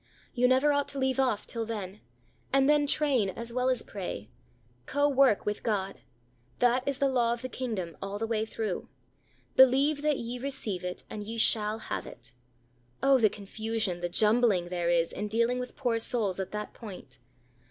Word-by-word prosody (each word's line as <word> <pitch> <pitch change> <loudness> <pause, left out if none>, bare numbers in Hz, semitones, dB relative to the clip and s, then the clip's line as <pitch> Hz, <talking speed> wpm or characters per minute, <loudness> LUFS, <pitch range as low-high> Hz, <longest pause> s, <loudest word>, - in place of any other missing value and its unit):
You 250 -1 +3
never 265 +3 +4
ought 285 0 +1
to 280 - -4
leave 265 0 0
off 250 -6 +1
till 230 -1 -4
then, 210 -3 -6 0.5
and 270 0 +4
then 295 -1 +4
train 275 -9 +2
as 235 +4 -6
well 250 +1 +1
as 255 -3 +1
pray 190 - -6 0.6
co 285 +1 +2
work 270 -6 +3
with 210 0 -2
God: 195 -4 -2 0.6
that 245 +1 +3
is 280 -2 0
the 280 - +2
law 240 -3 +2
of 235 - -7
the - - -2
kingdom, 215 -11 -4
all 195 +1 -4
the 225 - -2
way 225 -1 0
through. 220 -3 -4 0.7
Believe 275 +3 +5
that 300 -2 +1
ye 240 +1 -5
receive 230 -9 -3
it, 180 0 -5
and 210 - -6
ye 225 +2 -6
shall 215 -1 +2
have - - -5
it. 120 0 -11 0.7
Oh! 275 -1 +5
the 215 -3 +5
confusion, 210 -2 -3
the 175 - -2
jumbling 210 -3 +3
there 175 -1 -1
is, 170 -1 +2
in 210 - -4
dealing 235 +3 +1
with 250 0 -6
poor 230 -2 0
souls 215 -5 0
at 190 - -3
that 210 0 -5
point. 185 - -10
230 Hz, 185 wpm, -29 LUFS, 205-260 Hz, 0.7 s, Believe